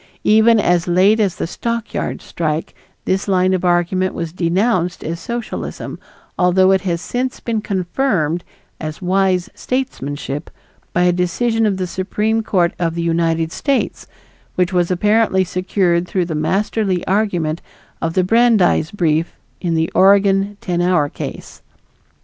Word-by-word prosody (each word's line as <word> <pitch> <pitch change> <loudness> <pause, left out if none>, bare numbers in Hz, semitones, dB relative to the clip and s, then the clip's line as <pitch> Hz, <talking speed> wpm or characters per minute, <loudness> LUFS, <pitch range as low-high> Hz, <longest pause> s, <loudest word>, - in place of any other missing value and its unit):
Even 220 +1 +5
as 175 -3 +2
late 190 +5 +4
as 200 -5 +1
the - - -3
stockyard 230 +6 -3
strike 155 -1 -3 0.3
this 190 +2 0
line 185 -1 +2
of 185 -1 -1
argument 180 +1 +1
was 165 -1 -4
denounced 180 +1 0
as 165 +1 -4
"socialism" 235 +2 -5 0.4
although 185 +1 +4
it 190 -1 +3
has 175 -3 -1
since 250 +7 -3
been 225 -2 -2
confirmed 180 - -1 0.4
as 155 -1 -5
wise 185 -1 +1
statesmanship 145 - -4 0.4
by 180 - +1
a 180 - +4
decision 220 +6 +1
of 195 -2 0
the 185 - -1
Supreme 210 +5 -1
Court 180 -5 +1
of 165 -2 -1
the 170 - -2
United 165 -1 0
States 280 +7 -1 0.5
which 180 0 +1
was 175 -1 +2
apparently 205 +1 +2
secured 180 -1 0
through 180 -1 0
the 165 - -4
masterly 190 +3 0
argument 180 -6 0 0.4
of 165 0 -2
the 185 - +3
Brandeis 220 -6 +3
brief 165 -4 0 0.3
in 170 -3 0
the 160 0 0
Oregon 195 +1 +4
ten 175 -2 -1
hour 175 -5 +2
case. - - -8
185 Hz, 145 wpm, -18 LUFS, 170-205 Hz, 0.5 s, Even